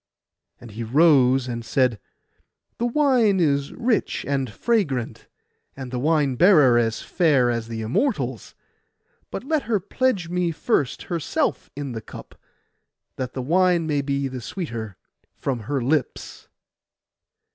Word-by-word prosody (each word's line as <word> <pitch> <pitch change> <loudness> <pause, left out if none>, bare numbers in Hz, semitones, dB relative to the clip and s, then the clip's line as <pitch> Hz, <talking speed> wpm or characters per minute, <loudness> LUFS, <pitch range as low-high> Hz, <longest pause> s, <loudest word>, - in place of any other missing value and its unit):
And 120 -2 -12
he 115 +3 -6
rose, 135 -1 +4
and 120 -1 -4
said, 120 -1 +1 0.8
'The 240 - +1
wine 240 -7 +3
is 140 -4 +1
rich 235 -2 -1
and 135 -4 -1
fragrant, 140 - -1 0.5
and 130 -2 -7
the 125 - -3
wine 150 -1 +2
bearer 150 -10 +6
as 115 -1 -1
fair 145 -9 +2
as 115 -1 -3
the 115 -1 -5
Immortals; 130 - -2 0.7
but - - -6
let 310 +2 0
her 215 -3 +2
pledge 205 -1 -1
me 175 0 -1
first 150 - -1
herself 170 -5 -2
in 140 -2 -5
the 115 -2 -5
cup, - - -12 0.8
that 130 -1 -4
the 130 - -4
wine 175 +3 +2
may 150 -2 0
be 140 0 -1
the 130 -1 -6
sweeter 115 - -6 0.4
from 130 -4 -3
her 145 -1 0
lips. 140 +1 -2
140 Hz, 135 wpm, -23 LUFS, 125-180 Hz, 0.8 s, bearer